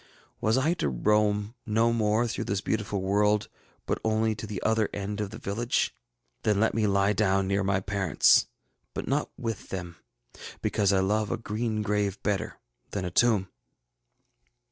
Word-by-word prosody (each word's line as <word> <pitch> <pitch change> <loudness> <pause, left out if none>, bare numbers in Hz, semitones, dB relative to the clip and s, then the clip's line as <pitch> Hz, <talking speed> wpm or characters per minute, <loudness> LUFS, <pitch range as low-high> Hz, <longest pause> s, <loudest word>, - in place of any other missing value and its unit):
Was 110 +3 +2
I 150 +6 +2
to - - +1
roam 105 - +1
no 115 +1 +2
more 110 +1 +2
through 115 - -3
this 100 0 -1
beautiful 105 -2 -2
world, 105 +2 +2 0.4
but - - -1
only 110 0 +1
to 110 +1 -7
the 105 -3 -4
other 110 -1 +2
end 100 +1 -4
of 105 - -3
the 110 - -8
village? 115 +3 -1 0.5
Then 105 -2 +2
let 110 - +2
me 110 -2 +1
lie 100 +1 +3
down 95 -2 +2
near 100 +1 +1
my 95 0 +1
parents, 95 -4 +3 0.5
but - - -4
not - - 0
with 115 -3 -4
them, 85 -3 -6 0.6
because 100 -2 +1
I 95 -1 +3
love 105 +2 +1
a - - -1
green 110 0 -2
grave 105 -1 0
better 105 -2 -1 0.3
than 95 -3 -3
a 90 - -3
tomb. 105 -2 +3
105 Hz, 165 wpm, -28 LUFS, 100-110 Hz, 0.6 s, lie